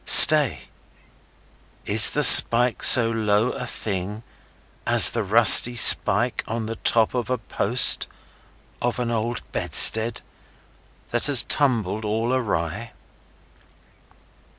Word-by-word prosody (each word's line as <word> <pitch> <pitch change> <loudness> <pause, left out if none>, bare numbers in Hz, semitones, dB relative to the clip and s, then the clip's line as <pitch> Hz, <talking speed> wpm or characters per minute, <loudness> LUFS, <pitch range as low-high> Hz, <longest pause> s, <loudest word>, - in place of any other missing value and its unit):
Stay! - - +5 1.2
Is - - +2
the - - -5
spike 120 +1 +5
so 115 -2 +4
low 110 +1 -6
a 125 -2 -13
thing 105 0 -9 0.6
as - - +1
the 115 - -8
rusty 115 +3 +4
spike 115 - +1
on 115 0 -10
the 115 +1 -12
top 115 -2 -5
of 125 -1 -10
a 130 - -7
post 115 +2 -1 0.7
of 120 0 -8
an 120 -1 -9
old 115 +1 -9
bedstead 110 +1 +1 0.9
that 120 +3 -3
has 140 -4 +2
tumbled 110 -7 -6
all 110 +3 -8
awry? 105 -3 -9
115 Hz, 110 wpm, -16 LUFS, 110-120 Hz, 1.2 s, Stay